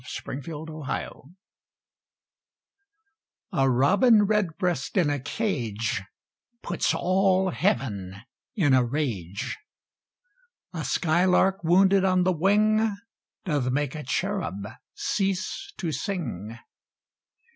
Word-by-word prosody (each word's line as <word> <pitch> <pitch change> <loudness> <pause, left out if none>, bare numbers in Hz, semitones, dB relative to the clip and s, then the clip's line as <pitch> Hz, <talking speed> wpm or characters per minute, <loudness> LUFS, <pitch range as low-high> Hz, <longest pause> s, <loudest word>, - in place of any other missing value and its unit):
THREE 130 - -6
THINGS - - -16
TO 155 -2 -6
REMEMBER 155 -4 -5 2.3
A 135 0 +2
Robin 200 - +5
Redbreast 185 -6 -1
in 165 -6 +3
a 145 - -1
cage 120 - -2 0.6
Puts - - 0
all 190 0 +2
Heaven 100 - -1 0.4
in 155 - +3
a 130 -1 +5
rage. 115 - -3 1.1
A - - -4
skylark 180 +2 +2
wounded 190 +3 +4
on 185 -1 +3
the 185 0 +2
wing 210 +4 +2 0.5
Doth 145 -8 0
make 145 0 -1
a 155 - -5
cherub 150 - -2 0.3
cease 195 - -2
to 170 -5 -2
sing. 125 - -4
165 Hz, 100 wpm, -26 LUFS, 130-195 Hz, 2.3 s, Robin